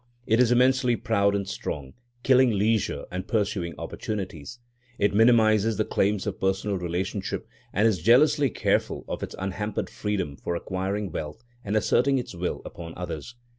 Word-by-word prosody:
It 110 +2 +2
is 125 -1 +4
immensely 125 0 +4
proud 100 -4 +1
and 100 -1 -2
strong, 70 -8 -5 0.3
killing 130 -1 +5
leisure 110 0 0
and 90 +1 -4
pursuing 100 -6 -1
opportunities. 95 -1 -5 0.4
It 100 0 +2
minimises 110 -1 +4
the 110 - +1
claims 100 0 0
of 105 -3 -4
personal 95 +1 0
relationship 90 +1 -3 0.2
and 105 +4 +3
is 100 -7 0
jealously 140 - +5
careful - - 0
of - - -4
its - - -5
unhampered 95 +3 -3
freedom 95 -9 -3
for 85 - -3
acquiring 95 +2 -3
wealth 75 +8 -6 0.2
and 105 +1 -2
asserting 135 +5 +3
its 125 - -4
will 90 +1 -3
upon 85 -1 -8
others. 90 +5 -6
105 Hz, 155 wpm, -26 LUFS, 95-115 Hz, 0.4 s, killing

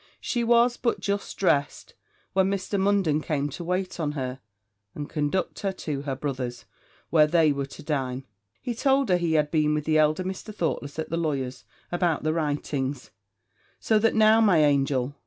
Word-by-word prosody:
She 240 -1 -1
was 235 +1 +4
but 235 - 0
just 200 0 -3
dressed 145 -7 0 0.4
when 190 0 +3
Mr. 200 0 -2
Munden 190 -6 +2
came 145 -2 -1
to 145 +5 -7
wait 180 +1 -2
on 150 -2 -1
her, 130 -2 -4 0.6
and 145 -1 -5
conduct 150 +4 -2
her 195 - -1
to 150 -6 -4
her 140 -2 -3
brother's, 130 -3 -4 0.5
where 155 -2 +5
they 160 -1 +4
were 140 -1 -2
to - - -12
dine: 135 -3 -2 0.4
he 245 - -2
told 270 +1 +2
her 180 - +4
he 170 -2 0
had 150 -1 +2
been 150 -1 +2
with 150 -1 -2
the 155 -1 +3
elder 155 +3 +2
Mr. 190 +3 -6
Thoughtless 145 -5 -3
at 160 - -4
the 165 - 0
lawyer's, 140 -6 -3 0.3
about 175 -4 0
the 155 0 +1
writings; 145 -4 -2 0.7
'So 220 -1 +2
that 225 +1 +2
now, 220 +1 +5
my 180 -8 +5
angel!' 140 -2 +1
155 Hz, 180 wpm, -26 LUFS, 145-190 Hz, 0.7 s, where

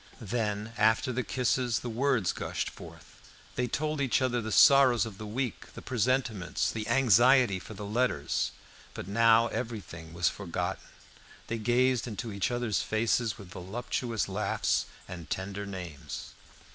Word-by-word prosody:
Then, 110 -1 -2
after 110 +4 +3
the 125 - 0
kisses, 125 -1 0
the - - -5
words 120 -4 +1
gushed - - -3
forth. - - -13 0.3
They 125 - -1
told 150 +4 -2
each 135 -3 +2
other 125 -2 0
the 110 0 -5
sorrows 135 -1 +6
of 105 -3 -9
the 110 - -6
week, 120 0 -4
the - - -8
presentiments, 115 -6 0
the 110 -1 -4
anxiety 125 -3 +5
for 100 +4 -10
the 105 - -6
letters; 120 +5 0 0.5
but - - -6
now 115 +2 +5
everything 100 -9 -6
was 85 +1 +1
forgotten; 90 -1 -3 0.6
they 115 0 -3
gazed 125 +2 +2
into 115 0 -5
each 100 -1 0
other's 120 -4 0
faces 110 -1 0
with 95 -3 -12
voluptuous 115 +4 -3
laughs, 100 +2 0 0.2
and 85 -2 -8
tender 100 +1 -4
names. 90 -7 -7
115 Hz, 145 wpm, -29 LUFS, 100-125 Hz, 0.6 s, sorrows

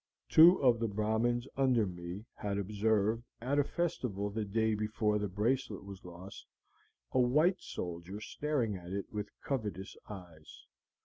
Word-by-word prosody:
"Two 170 +3 +9
of 120 -3 +5
the 115 - 0
Brahmins 110 +4 0
under 130 -5 +3
me 90 +3 -6
had 100 -1 -3
observed, 105 +2 +1 0.2
at 135 +5 0
a - - +5
festival 125 - -2
the 110 +1 -2
day 110 +2 +1
before 105 0 0
the 105 - -1
bracelet 105 +2 -1
was 100 -1 -10
lost, 90 +2 -10 0.6
a 130 - +2
white 150 +9 +4
soldier 90 +3 -5
staring 125 -3 -1
at 90 -1 -8
it 100 +2 -4
with 105 0 -3
covetous 105 - -3
eyes. 85 -6 -11
105 Hz, 145 wpm, -33 LUFS, 100-120 Hz, 0.6 s, Two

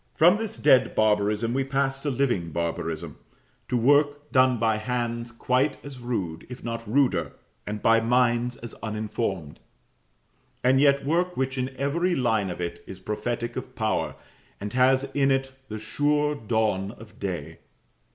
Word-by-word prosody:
From 175 +6 +6
this 225 0 -4
dead 130 -3 +4
barbarism 105 +1 +2
we 135 +1 +1
pass 135 0 0
to 145 - -2
living 120 -10 0
barbarism 85 0 -3 0.5
to 125 - +1
work 145 +4 +3
done 130 -2 +4
by 110 -1 +2
hands 120 0 -2
quite 125 +4 +1
as 140 -3 -8
rude, 95 -10 -4
if 125 0 -9
not 115 -2 -5
ruder, 125 -10 +2 0.3
and 105 0 -4
by 115 0 +5
minds 120 +1 +2
as 120 -1 -8
uninformed; 105 -7 -3 1.0
and 130 +2 +4
yet 140 -1 +4
work 175 +4 0
which 130 0 -1
in 130 0 -1
every 170 +6 +1
line 110 -6 +1
of 90 - -6
it 85 -1 -4
is 95 - -8
prophetic 120 +4 -3
of - - -6
power, - - -1 0.4
and 105 +1 -5
has 130 +1 +4
in 140 -1 +3
it 135 0 +1 0.2
the 110 - -4
sure 145 +7 +1
dawn 110 -5 -1
of 110 -2 -15
day. 85 -5 -4
120 Hz, 155 wpm, -26 LUFS, 105-135 Hz, 1.0 s, From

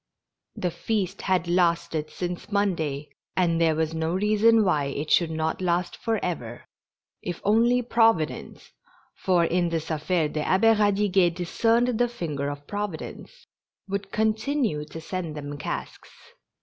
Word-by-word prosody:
The 180 - -2
feast 200 -1 -2
had 185 -2 +1
lasted 170 -3 +1
since 180 +3 -5
Monday, 160 -8 -1 0.3
and 170 -2 +2
there 160 -1 +3
was 160 0 -1
no 160 +1 -1
reason 215 +2 +4
why 150 -6 +2
it 140 +2 -4
should 170 -2 +4
not 160 +2 -2
last 175 0 0
forever, 170 - -3 0.6
if 175 -1 -5
only 235 +4 +3
Providence 225 -9 +1 0.4
(for 180 -3 +2
in 175 0 +1
this 165 -1 -3
affair 160 +1 0
the 155 0 -3
Abbe 225 +7 +4
Radiguet 200 -4 +2
discerned 230 +7 +1
the 245 - +4
finger 150 -11 -3
of 145 0 -7
Providence) 205 - -6 0.4
would 200 0 -4
continue 220 - 0
to 155 +2 -9
send 165 -2 -5
them 145 0 -5
casks. - - -5
180 Hz, 135 wpm, -25 LUFS, 160-210 Hz, 0.6 s, reason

